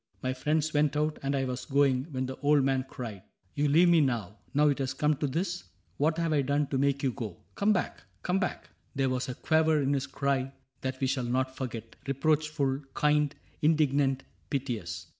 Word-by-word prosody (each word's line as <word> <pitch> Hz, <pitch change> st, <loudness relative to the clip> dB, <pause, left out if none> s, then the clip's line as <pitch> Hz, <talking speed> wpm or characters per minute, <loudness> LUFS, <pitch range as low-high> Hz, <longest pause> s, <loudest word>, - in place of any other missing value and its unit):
My 130 Hz, 0 st, 0 dB
friends 150 Hz, +4 st, 0 dB
went 150 Hz, 0 st, +2 dB
out, 150 Hz, +1 st, 0 dB
And 140 Hz, 0 st, -1 dB
I 135 Hz, -1 st, 0 dB
was 125 Hz, 0 st, -4 dB
going, 140 Hz, -1 st, +2 dB
when 130 Hz, -3 st, -2 dB
the 130 Hz, 0 st, -5 dB
old 145 Hz, -1 st, +3 dB
man 130 Hz, -1 st, +1 dB
cried: 110 Hz, -6 st, -6 dB, 0.2 s
*' 90 Hz, -, -40 dB
You 145 Hz, +1 st, +1 dB
leave 165 Hz, +5 st, +5 dB
me 170 Hz, -2 st, +6 dB
now 115 Hz, -7 st, -1 dB
— -, -, -33 dB
now 150 Hz, +1 st, +5 dB
it 140 Hz, -, 0 dB
has 135 Hz, 0 st, -2 dB
come 150 Hz, +2 st, +2 dB
to 145 Hz, -, 0 dB
this? 175 Hz, +5 st, -2 dB, 0.3 s
What 155 Hz, +3 st, +2 dB
have 165 Hz, -2 st, +1 dB
I 145 Hz, -, +3 dB
done 140 Hz, +2 st, +1 dB
to 135 Hz, -, 0 dB
make 140 Hz, 0 st, +1 dB
you 135 Hz, -, +2 dB
go? 110 Hz, -8 st, -7 dB
Come 205 Hz, +1 st, +2 dB
back! 185 Hz, -, -1 dB, 0.2 s
Come 180 Hz, +2 st, +1 dB
back! 185 Hz, -, -3 dB
" -, -, -39 dB
There 135 Hz, -1 st, +1 dB
was 125 Hz, 0 st, -2 dB
a 125 Hz, -, -4 dB
quaver 160 Hz, +1 st, +3 dB
in 140 Hz, 0 st, +1 dB
his 140 Hz, 0 st, -1 dB
cry 135 Hz, -1 st, -1 dB, 0.3 s
That 130 Hz, 0 st, -3 dB
we 135 Hz, -, +1 dB
shall 130 Hz, -1 st, 0 dB
not 130 Hz, +2 st, 0 dB
forget 115 Hz, -4 st, -6 dB
— 140 Hz, -, -19 dB
reproachful, 140 Hz, -1 st, +1 dB, 0.2 s
kind, 150 Hz, -1 st, +2 dB, 0.3 s
Indignant, 145 Hz, -3 st, +2 dB, 0.3 s
piteous. 130 Hz, -5 st, -3 dB
140 Hz, 215 wpm, -29 LUFS, 130-150 Hz, 0.3 s, me